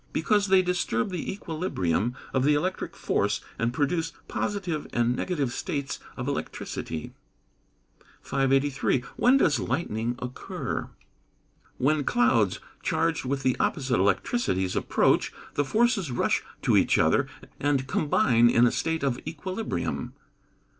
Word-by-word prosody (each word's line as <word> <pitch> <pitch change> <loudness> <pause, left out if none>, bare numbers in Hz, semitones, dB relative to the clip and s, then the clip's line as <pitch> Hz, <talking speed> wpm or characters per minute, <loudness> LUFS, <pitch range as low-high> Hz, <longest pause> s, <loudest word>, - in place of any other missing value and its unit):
_ - - -31
Because 205 -2 +2
they 190 -1 +5
disturb 180 -7 0
the 180 -3 -3
equilibrium 125 - -1 0.2
of 130 - +2
the 145 +2 +4
electric 185 +5 -2
force, 105 +1 0 0.2
and 115 +1 +1
produce 160 +5 0
positive 180 -7 -2
and 120 +1 +1
negative 140 -6 -1
states 140 -2 -3 0.2
of 125 -1 -4
electricity. 80 - -4 1.1
583. 135 -1 +1
When 255 +3 +5
does - - +3
lightning 115 -6 -1
occur? 125 +1 -5 0.9
When 150 +3 +2
clouds, 115 -6 +2 0.2
charged - - 0
with 135 +1 -2
the 130 -1 +2
opposite 130 -6 +1
electricities 95 - +1
approach, - - +2 0.2
the 145 - +1
forces 215 - +2
rush 120 - +1 0.2
to - - +3
each - - +4
other, - - +3 0.3
and 140 -2 +1
combine 125 -4 +3
in 120 0 +5
a 120 - +3
state 160 -2 -1
of 130 -3 0
equilibrium. 185 +7 -3
140 Hz, 125 wpm, -27 LUFS, 120-170 Hz, 1.1 s, they